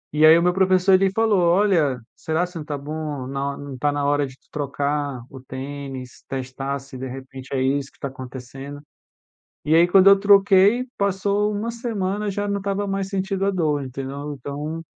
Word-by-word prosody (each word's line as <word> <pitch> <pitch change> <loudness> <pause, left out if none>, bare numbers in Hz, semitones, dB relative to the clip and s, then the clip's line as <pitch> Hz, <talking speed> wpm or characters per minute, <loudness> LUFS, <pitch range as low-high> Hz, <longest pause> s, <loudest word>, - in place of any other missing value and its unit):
E 155 +1 +6
aí, 160 +1 +8
o 170 - +2
meu 180 0 +3
professor, 190 0 +3
ele 190 +1 +5
falou: 220 -1 +2
"Olha, 170 -7 +3 0.2
será 160 +2 -1
se 180 0 -14
não 155 - -5
tá 150 -1 -4
bom? 150 -1 -5
na 140 +1 -3
ho - - -12
não 140 -2 -7
tá 145 +3 +1
na 145 0 -1
hora 145 0 +2
de 130 0 -14
trocar 145 -3 -2
o 135 -1 -11
tênis, 130 -1 -7
testar 135 +1 -3
se 135 0 -11
de 130 - -4
repente 130 0 -9
é 135 - 0
isso 135 +1 0
que - - -28
tá 140 - -4
acontecendo?" 135 +2 -9 0.9
E 155 - +3
aí, 170 +1 +6
quando 190 +2 +6
eu 200 0 +7
troquei, 200 +3 +5
passou 200 +1 +1
1 215 +3 -2
semana, 210 -3 -2
já 205 +1 -2
não 200 - 0
estava 200 +1 -2
mais 195 -1 -2
sentindo 195 0 -2
a 200 - +3
dor, 155 -6 0
entendeu? 135 +3 -6
Então 145 +4 -5
150 Hz, 195 wpm, -22 LUFS, 135-195 Hz, 0.9 s, aí